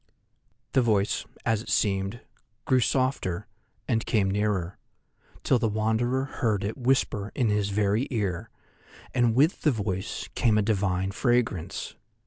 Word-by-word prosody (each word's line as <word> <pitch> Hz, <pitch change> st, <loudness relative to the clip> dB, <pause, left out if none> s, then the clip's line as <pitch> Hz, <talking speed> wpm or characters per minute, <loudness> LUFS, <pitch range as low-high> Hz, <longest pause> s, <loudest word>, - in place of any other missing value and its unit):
The 130 Hz, -, +4 dB
voice, 105 Hz, -4 st, +1 dB, 0.2 s
as 110 Hz, -2 st, +1 dB
it -, -, -10 dB
seemed, 95 Hz, +3 st, 0 dB, 0.4 s
grew 130 Hz, -, +4 dB
softer 120 Hz, -8 st, 0 dB, 0.4 s
and 115 Hz, -3 st, +1 dB
came 100 Hz, -4 st, +1 dB
nearer, 100 Hz, -3 st, -1 dB, 0.6 s
till 130 Hz, -, +3 dB
the 115 Hz, -, +1 dB
Wanderer 110 Hz, +5 st, 0 dB
heard 110 Hz, -7 st, -1 dB
it 105 Hz, +2 st, -2 dB
whisper 120 Hz, -5 st, 0 dB
in 120 Hz, -5 st, +2 dB
his 105 Hz, -1 st, +1 dB
very 105 Hz, +5 st, +1 dB
ear, 100 Hz, -8 st, -2 dB, 0.6 s
and 120 Hz, -2 st, +2 dB
with 150 Hz, +7 st, +3 dB
the 155 Hz, -, +3 dB
voice 100 Hz, -7 st, -3 dB
came 110 Hz, -3 st, +2 dB
a 105 Hz, -, +3 dB
divine 95 Hz, -3 st, 0 dB
fragrance. 115 Hz, -6 st, 0 dB
110 Hz, 135 wpm, -27 LUFS, 100-120 Hz, 0.6 s, The